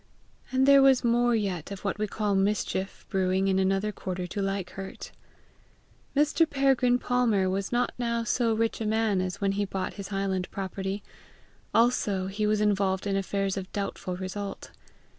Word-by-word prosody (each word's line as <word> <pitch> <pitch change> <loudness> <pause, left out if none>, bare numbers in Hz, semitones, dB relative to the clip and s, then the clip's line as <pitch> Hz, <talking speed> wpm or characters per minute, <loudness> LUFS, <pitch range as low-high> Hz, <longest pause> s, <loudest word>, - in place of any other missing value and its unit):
And 260 +1 +3
there 280 0 +8
was 270 -2 +5
more 240 0 +3
yet 195 -7 -2
of 200 -1 -7
what 200 +1 -1
we 215 - 0
call 210 0 -1
mischief 195 -1 -1
brewing 190 0 +1
in 190 0 +2
another 195 +2 +1
quarter 185 -3 -4
to 200 +3 -4
like 195 -2 -2
hurt. 195 -1 -8 1.0
Mr. 305 +3 +3
Peregrine 270 -3 +3
Palmer 240 -7 +1
was 190 +1 -2
not 245 0 +1
now 235 -1 0
so 230 0 +1
rich 225 +1 -1
a 220 - -1
man 215 -3 +1
as 185 -1 -3
when 200 -1 +1
he 200 +1 0
bought 190 -1 -3
his 195 - -6
highland 195 -2 -2
property; 195 +1 -4 0.7
also 220 -5 +2
he 205 +2 -1
was 215 0 +2
involved 195 -2 +1
in 200 -1 0
affairs 195 0 -1
of 190 -1 -6
doubtful 195 -3 -3
result. 195 +1 -6
200 Hz, 170 wpm, -27 LUFS, 190-230 Hz, 1.0 s, there